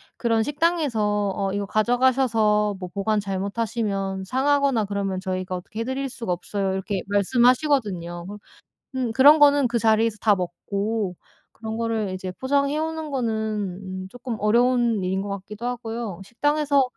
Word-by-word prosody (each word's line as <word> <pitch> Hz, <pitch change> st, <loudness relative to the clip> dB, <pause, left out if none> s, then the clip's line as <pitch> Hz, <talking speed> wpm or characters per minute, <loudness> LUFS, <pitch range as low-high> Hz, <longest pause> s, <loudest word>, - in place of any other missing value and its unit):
그런 230 Hz, -2 st, +1 dB
식당에서 235 Hz, -, 0 dB
"어 195 Hz, -1 st, -1 dB
이거 200 Hz, +1 st, -2 dB
가져가셔서 220 Hz, -2 st, +2 dB
뭐 180 Hz, -, -5 dB
보관 210 Hz, +2 st, 0 dB
잘못하시면 195 Hz, 0 st, -2 dB
상하거나 265 Hz, +1 st, +2 dB
그러면 195 Hz, -2 st, -2 dB
저희가 185 Hz, -1 st, -3 dB
어떻게 215 Hz, +5 st, -7 dB
해 -, -, 0 dB
드릴 260 Hz, +3 st, -2 dB
수가 235 Hz, -6 st, -5 dB
없어요." 195 Hz, +2 st, -2 dB
이렇게 190 Hz, 0 st, -2 dB
말씀하시거든요. 205 Hz, -, +1 dB
그런 205 Hz, +1 st, -8 dB, 0.7 s
음 -, -, -3 dB
그런 285 Hz, +6 st, +7 dB
거는 285 Hz, -2 st, +6 dB
그 235 Hz, 0 st, -1 dB
자리에서 225 Hz, -1 st, +2 dB
다 210 Hz, -2 st, +4 dB
먹고 195 Hz, +2 st, -3 dB, 0.3 s
그런 220 Hz, -1 st, -6 dB
거를 225 Hz, -3 st, -1 dB
이제 185 Hz, 0 st, -5 dB
포장해 280 Hz, +7 st, 0 dB
오는 320 Hz, 0 st, -3 dB
거는 250 Hz, -5 st, -1 dB, 0.7 s
음 -, -, -8 dB
쪼끔 245 Hz, +1 st, -6 dB
어려운 235 Hz, -1 st, +2 dB
일인 190 Hz, +1 st, -1 dB
것 200 Hz, -, -5 dB
같기도 210 Hz, +4 st, -9 dB
하고요. 230 Hz, -5 st, -4 dB
식당에서 290 Hz, +6 st, +1 dB
220 Hz, 355 characters per minute, -24 LUFS, 195-255 Hz, 0.7 s, 그런